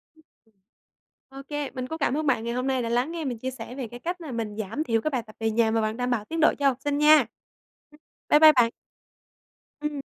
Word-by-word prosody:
Ừm. 315 Hz, -, -24 dB, 1.1 s
Ô 270 Hz, 0 st, -10 dB
kê, 290 Hz, -2 st, -3 dB
mình 255 Hz, -1 st, -5 dB
cũng 320 Hz, -, -5 dB
cảm 280 Hz, -, 0 dB
ơn 310 Hz, -1 st, -2 dB
bạn 250 Hz, -5 st, +2 dB
ngày 235 Hz, 0 st, -3 dB
hôm 250 Hz, +2 st, -2 dB
nay 260 Hz, -1 st, 0 dB
đã 230 Hz, -, -3 dB
lắng 245 Hz, +7 st, 0 dB
nghe 330 Hz, -2 st, -4 dB
mình 245 Hz, -4 st, -3 dB
chia 260 Hz, +3 st, -4 dB
sẻ 255 Hz, -1 st, -9 dB
về 260 Hz, -4 st, -5 dB
cái 240 Hz, +2 st, -10 dB
cách 350 Hz, +5 st, -4 dB
là 310 Hz, -5 st, -7 dB
mình 225 Hz, -3 st, -4 dB
giảm 220 Hz, +8 st, -3 dB
thiểu 230 Hz, -6 st, 0 dB
cái 310 Hz, -, -1 dB
bài 250 Hz, -3 st, -1 dB
tập 215 Hz, -1 st, -16 dB
về 225 Hz, 0 st, 0 dB
nhà 220 Hz, 0 st, +2 dB
mà 225 Hz, 0 st, +1 dB
vẫn 215 Hz, +1 st, -2 dB
đảm 250 Hz, 0 st, -1 dB
bảo 220 Hz, -3 st, -1 dB
tiến 325 Hz, +6 st, -4 dB
độ 315 Hz, -, +5 dB
cho 285 Hz, -, +3 dB
học 265 Hz, -3 st, +1 dB
sinh, 290 Hz, 0 st, 0 dB
nha. 300 Hz, +1 st, +6 dB, 0.7 s
Ừm. 300 Hz, -, -20 dB, 0.3 s
Bái 295 Hz, -, +6 dB
bai 310 Hz, 0 st, +9 dB
bạn. 245 Hz, -4 st, +4 dB, 1.1 s
Ừm. 295 Hz, -2 st, -3 dB
260 Hz, 260 wpm, -25 LUFS, 230-300 Hz, 1.1 s, bai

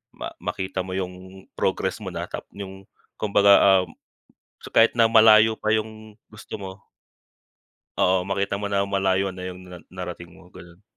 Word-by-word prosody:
ma -, -, -6 dB
makita 95 Hz, 0 st, -4 dB
mo 95 Hz, -, -5 dB
yung 95 Hz, 0 st, -7 dB
progress -, -, -2 dB
mo -, -, -9 dB
na, -, -, -3 dB, 0.3 s
yung 95 Hz, -1 st, -9 dB, 0.3 s
kumbaga, 100 Hz, -2 st, +5 dB
um, -, -, -11 dB, 0.8 s
kahit 115 Hz, -, +4 dB
na 115 Hz, -1 st, +3 dB
malayo 110 Hz, 0 st, +6 dB
pa 110 Hz, 0 st, +1 dB
yung 110 Hz, 0 st, -5 dB, 0.2 s
gusto 110 Hz, -, -11 dB
mo 100 Hz, -2 st, -6 dB, 1.3 s
Oo, 90 Hz, 0 st, +2 dB
makita 100 Hz, 0 st, -2 dB
mo 100 Hz, -, -4 dB
na 100 Hz, -1 st, 0 dB
malayo 95 Hz, -1 st, 0 dB
na 90 Hz, 0 st, -9 dB
yung 90 Hz, 0 st, -8 dB
na 90 Hz, -, -9 dB
narating 90 Hz, -1 st, -8 dB
mo, 90 Hz, -, -18 dB
ganun. 85 Hz, +2 st, -15 dB
95 Hz, 155 wpm, -23 LUFS, 95-105 Hz, 1.3 s, malayo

